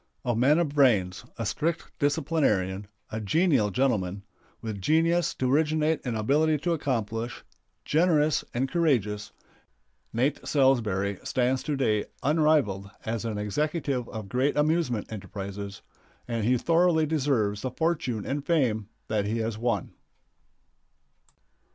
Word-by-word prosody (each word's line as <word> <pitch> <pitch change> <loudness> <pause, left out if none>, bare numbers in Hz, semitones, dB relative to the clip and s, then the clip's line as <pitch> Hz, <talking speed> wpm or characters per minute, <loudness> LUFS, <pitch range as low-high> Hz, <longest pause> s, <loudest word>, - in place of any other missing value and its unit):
A 120 -2 +1
man 135 +7 +4
of 170 -3 +1
brains, 115 -11 +2
a 115 - -3
strict 165 +10 -2
disciplinarian, 140 - +1 0.2
a 110 - -3
genial 140 - +2
gentleman, 100 -5 0 0.4
with 110 -3 -5
genius 165 - +2
to 130 0 0
originate 155 +1 +2
and 120 -3 -2
ability 150 +8 +2
to 175 - +1
accomplish, 115 -6 -2 0.4
generous 155 -2 +3
and 130 +3 0
courageous, 120 - 0 0.8
Nate 130 +5 0
Salsbury 110 -9 +1
stands 130 +1 0
to 150 - -2
day 110 -6 +1 0.2
unrivaled 145 -10 +2 0.2
as 115 0 -2
an 110 -2 -2
executive 135 - -1
of 110 -3 -6
great 130 +8 0
amusement 150 -8 0
enterprises, 100 0 -7 0.4
and 115 -3 -2
he 125 +2 +3
thoroughly 165 +2 +3
deserves 130 -10 0
the 130 - -2
fortune 130 -6 -1
and 140 +1 -2
fame 120 - +1 0.2
that 105 -2 0
he 110 +3 -1
has 115 -1 -2
won. 115 -5 -1
125 Hz, 125 wpm, -27 LUFS, 105-150 Hz, 0.8 s, man